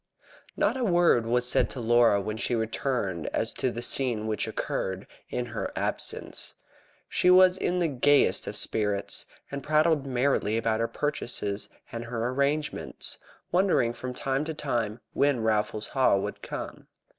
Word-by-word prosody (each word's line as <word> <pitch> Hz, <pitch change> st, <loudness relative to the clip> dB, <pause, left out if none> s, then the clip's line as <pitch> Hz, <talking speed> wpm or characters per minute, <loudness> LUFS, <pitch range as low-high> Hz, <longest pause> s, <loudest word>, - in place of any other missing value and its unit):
Not -, -, +1 dB
a 255 Hz, -, -1 dB
word 175 Hz, -, +3 dB
was 125 Hz, +1 st, +3 dB
said -, -, +3 dB
to 130 Hz, -, -5 dB
Laura 120 Hz, -2 st, +4 dB
when 105 Hz, +2 st, -3 dB
she 110 Hz, +3 st, -1 dB
returned 110 Hz, -, -2 dB
as -, -, +3 dB
to 130 Hz, -, 0 dB
the 120 Hz, 0 st, -5 dB
scene 120 Hz, -5 st, +1 dB
which 110 Hz, -1 st, -1 dB
had -, -, -7 dB
occurred 95 Hz, 0 st, -3 dB, 0.2 s
in 125 Hz, -, -2 dB
her -, -, -3 dB
absence. -, -, -3 dB, 0.5 s
She 180 Hz, -, +2 dB
was 185 Hz, 0 st, +7 dB
in 180 Hz, -1 st, -1 dB
the 175 Hz, -2 st, +2 dB
gayest 145 Hz, 0 st, +3 dB
of -, -, -4 dB
spirits, 105 Hz, -2 st, -1 dB, 0.2 s
and 140 Hz, 0 st, -4 dB
prattled 155 Hz, -1 st, +2 dB
merrily 125 Hz, -4 st, +1 dB
about 115 Hz, -1 st, 0 dB
her 115 Hz, -, +1 dB
purchases 115 Hz, -9 st, -3 dB, 0.2 s
and 115 Hz, 0 st, -5 dB
her 115 Hz, 0 st, -2 dB
arrangements, 140 Hz, +3 st, -2 dB, 0.3 s
wondering 180 Hz, -10 st, +2 dB
from 125 Hz, +1 st, -6 dB
time 135 Hz, +2 st, -1 dB
to 160 Hz, 0 st, -4 dB
time 120 Hz, -6 st, -2 dB
when 140 Hz, -5 st, +2 dB
Raffles 105 Hz, -1 st, 0 dB
Haw 130 Hz, -7 st, +3 dB
would 95 Hz, -, -4 dB
come. -, -, -7 dB
125 Hz, 160 wpm, -27 LUFS, 110-145 Hz, 0.5 s, was